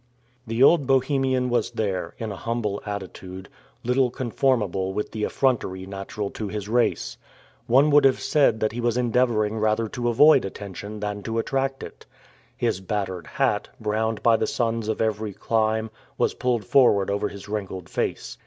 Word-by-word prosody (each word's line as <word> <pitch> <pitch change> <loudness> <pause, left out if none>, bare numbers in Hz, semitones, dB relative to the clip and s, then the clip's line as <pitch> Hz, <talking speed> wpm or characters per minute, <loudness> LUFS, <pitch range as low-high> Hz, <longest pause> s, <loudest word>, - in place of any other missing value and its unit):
The 115 +3 +2
old 145 -2 +5
Bohemian 130 -1 +1
was 120 -3 +1
there, 95 -4 -3
in 110 -2 -4
a - - -5
humble 110 -2 -2
attitude, 95 -2 -7 0.3
little 125 +1 +2
conformable 115 -7 0
with 105 - -3
the 110 -1 -4
effrontery 100 -8 0
natural 100 +1 -5
to 110 - -5
his 105 0 -5
race. 120 +2 0 0.5
One 135 +5 +5
would 145 0 +6
have 135 - +4
said 140 -8 +2
that 110 - +1
he 120 +2 -4
was 120 0 +1
endeavoring 115 -3 +1
rather 110 +1 +1
to 120 +1 -2
avoid 140 +4 +6
attention 100 +2 -7
than 105 -1 -3
to 115 +2 -4
attract 135 +3 -1
it. - - -11 0.5
His 95 - -1
battered 95 -4 -3
hat, - - 0
browned 110 0 -1
by 115 -1 +5
the - - -1
suns 115 -2 -1
of 110 - -1
every 110 -1 -1
clime, 110 +1 0 0.3
was - - +1
pulled 120 -4 -1
forward 100 -7 +4
over 100 +1 0
his 100 0 -10
wrinkled 95 -4 -5
face. - - -3
110 Hz, 165 wpm, -24 LUFS, 100-125 Hz, 0.5 s, would